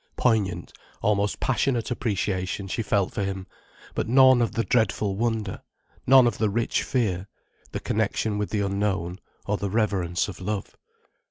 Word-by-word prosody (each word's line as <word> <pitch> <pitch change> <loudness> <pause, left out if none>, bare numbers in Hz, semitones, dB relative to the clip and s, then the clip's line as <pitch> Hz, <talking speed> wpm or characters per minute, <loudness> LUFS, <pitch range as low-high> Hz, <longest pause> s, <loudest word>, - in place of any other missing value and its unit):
Poignant, 100 -8 0 0.3
almost 105 0 +1
passionate 125 -1 0
appreciation 100 -5 -2
she 105 - -2
felt 100 -3 0
for 100 - -1
him, 95 -1 -3 0.5
but - - -2
none 130 0 +6
of 115 -3 0
the 115 - 0
dreadful 105 -4 +1
wonder, 110 -3 -2 0.5
none 130 -1 +8
of 120 -3 0
the 110 -1 +2
rich 115 +3 0
fear, 100 -7 -1 0.4
the - - -3
connection 105 -2 -1
with 105 - -2
the 105 - -1
unknown, 100 -3 -1 0.3
or 105 0 0
the 100 - -3
reverence 95 -5 0
of 95 -3 -8
love. 105 +1 -4
105 Hz, 155 wpm, -25 LUFS, 95-115 Hz, 0.5 s, none